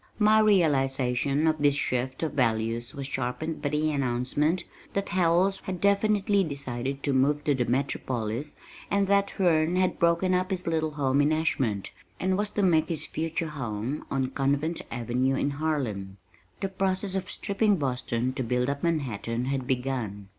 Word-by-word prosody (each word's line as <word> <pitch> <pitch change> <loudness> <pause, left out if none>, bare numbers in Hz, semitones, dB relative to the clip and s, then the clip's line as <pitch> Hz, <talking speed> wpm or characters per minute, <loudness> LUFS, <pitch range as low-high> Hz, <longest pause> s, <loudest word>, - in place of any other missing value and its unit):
My 215 0 +5
realization 140 - +2
of 155 -1 +2
this 145 -1 +3
shift 130 0 -1
of 160 - -1
values 115 -1 0
was 140 -1 -5
sharpened 135 +4 -3
by 145 - 0
the 150 +1 +1
announcement 140 +5 0 0.3
that 200 0 -2
Howells 180 +2 +2
had 185 -3 -4
definitely 200 0 +3
decided 135 -3 -4
to 140 - +1
move 145 +3 +2
to 145 - +2
the 125 -3 0
Metropolis, 125 -1 -2 0.3
and 200 0 +2
that 200 0 +3
Herne 170 -2 +2
had 185 0 +1
broken 170 +2 +3
up 185 0 +1
his 185 -2 -3
little 160 -1 0
home 140 -1 +2
in 145 +2 +3
Ashmont 135 -10 0 0.3
and 185 0 +1
was 205 +2 0
to 205 -1 -1
make 160 -4 +3
his 165 -4 0
future 165 0 -3
home 125 -1 -4
on 130 -1 -1
Convent 140 +5 0
Avenue 125 +3 0
in 140 +2 0
Harlem. 130 -11 -2 0.4
The 195 - -1
process 190 0 -1
of 190 -1 -3
stripping 205 +1 +1
Boston 125 -3 -1
to 130 - -2
build 125 +2 0
up 140 0 -5
Manhattan 125 -7 -1
had 135 -1 -2
begun. 125 -7 -2
145 Hz, 165 wpm, -27 LUFS, 130-175 Hz, 0.4 s, My